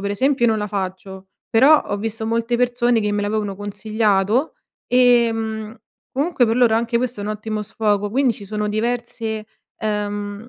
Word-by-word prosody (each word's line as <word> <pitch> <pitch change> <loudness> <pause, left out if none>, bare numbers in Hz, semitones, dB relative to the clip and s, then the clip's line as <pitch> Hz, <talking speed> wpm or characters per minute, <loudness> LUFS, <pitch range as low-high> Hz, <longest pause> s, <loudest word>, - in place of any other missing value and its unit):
per 200 +1 -2
esempio 260 +4 +1
io - - +4
non 220 - +1
la 210 - -2
faccio, 190 -1 -5 0.2
però 280 +7 +6
ho 205 - -3
visto 220 +1 -4
molte 230 +1 0
persone 245 -1 +2
che 210 -1 -1
me 205 0 0
l'avevano 205 -1 -2
consigliato 210 - 0 0.3
e, 245 -2 +5
mhmm, 220 -1 -4 0.4
comunque 275 -3 +1
per 225 +2 +1
loro 240 -3 +4
anche 235 +1 +1
questo 245 -4 -3
è - - -4
un 205 - -4
ottimo 215 0 -4
sfogo, 205 -1 -1
quindi 260 0 +2
ci 200 - -11
sono 210 +1 -3
diverse 225 0 -3 0.3
uhm, 205 +1 -3
220 Hz, 175 wpm, -21 LUFS, 205-240 Hz, 0.4 s, però